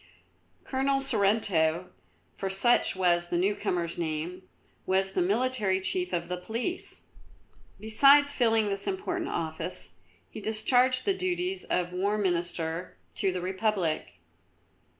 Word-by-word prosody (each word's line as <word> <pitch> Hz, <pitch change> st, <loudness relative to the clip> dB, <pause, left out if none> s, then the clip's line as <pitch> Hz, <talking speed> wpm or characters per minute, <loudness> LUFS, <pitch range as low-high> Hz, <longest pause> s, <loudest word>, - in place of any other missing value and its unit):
Colonel 270 Hz, +1 st, 0 dB
Sorrento, 195 Hz, -9 st, +1 dB, 0.4 s
for 195 Hz, -, -3 dB
such 215 Hz, +5 st, +3 dB
was 175 Hz, -2 st, +2 dB
the 175 Hz, -, 0 dB
newcomer's 175 Hz, -3 st, -1 dB
name, 165 Hz, +3 st, -3 dB, 0.5 s
was 190 Hz, +1 st, +1 dB
the 190 Hz, -, 0 dB
military 210 Hz, 0 st, +1 dB
chief 360 Hz, -, -1 dB
of 170 Hz, 0 st, -2 dB
the 180 Hz, +1 st, -3 dB
Police. 230 Hz, -, -3 dB, 0.8 s
Besides 280 Hz, +6 st, +5 dB
filling 225 Hz, -5 st, +3 dB
this 195 Hz, 0 st, -2 dB
important 375 Hz, -3 st, -2 dB
office, 160 Hz, -, -3 dB, 0.3 s
he -, -, -9 dB
discharged 250 Hz, +4 st, +2 dB
the 395 Hz, -, +3 dB
duties 370 Hz, 0 st, -2 dB
of 180 Hz, 0 st, -1 dB
War 200 Hz, +3 st, 0 dB
Minister 175 Hz, -3 st, -2 dB, 0.2 s
to 190 Hz, -, 0 dB
the 180 Hz, -1 st, -4 dB
Republic. 185 Hz, -, -1 dB
195 Hz, 120 wpm, -28 LUFS, 175-255 Hz, 0.8 s, Besides